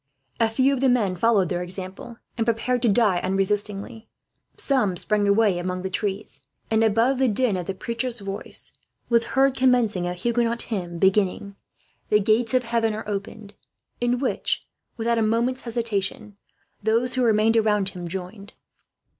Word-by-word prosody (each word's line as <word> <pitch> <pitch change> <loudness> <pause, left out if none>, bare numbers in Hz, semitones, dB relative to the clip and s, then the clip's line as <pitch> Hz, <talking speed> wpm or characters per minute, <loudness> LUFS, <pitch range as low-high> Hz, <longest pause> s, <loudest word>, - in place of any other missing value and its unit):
A 225 -1 +3
few 260 +5 +2
of 270 - -1
the 270 - +4
men 215 -7 +2
followed 200 -2 +2
their 175 -1 -2
example, 190 +5 -7 0.2
and 230 - 0
prepared 240 +2 0
to 240 - +3
die 205 -4 +3
unresistingly. 200 +3 -2 0.5
Some 225 -10 +1
sprang 205 +2 0
away 200 -3 +3
among 180 +1 -3
the 190 - -3
trees, 200 +1 -4 0.3
and 220 0 +3
above 230 +5 +2
the 265 - +3
din 210 -5 +1
the 190 +3 -5
preacher's 235 +3 -3
voice 195 0 -6 0.4
was 235 -1 +3
heard 270 0 +4
commencing 240 -9 +2
a 180 - -3
Huguenot 235 +4 0
hymn 180 -6 -4
beginning, 195 +1 +1 0.5
"The 210 - +4
gates 220 +4 +2
of 255 - +3
heaven 230 -2 0
are 215 0 -7
opened;" 205 0 -6 0.5
in 240 +1 +1
which, 260 0 -1 0.3
without 230 0 +1
a - - +1
moment's 235 +4 0
hesitation, 220 -3 -3 0.5
those 230 +4 +1
who 255 - 0
remained 225 -1 +3
around 210 -3 +2
him 180 -2 -7
joined. 190 +3 -7
220 Hz, 160 wpm, -24 LUFS, 195-235 Hz, 0.5 s, the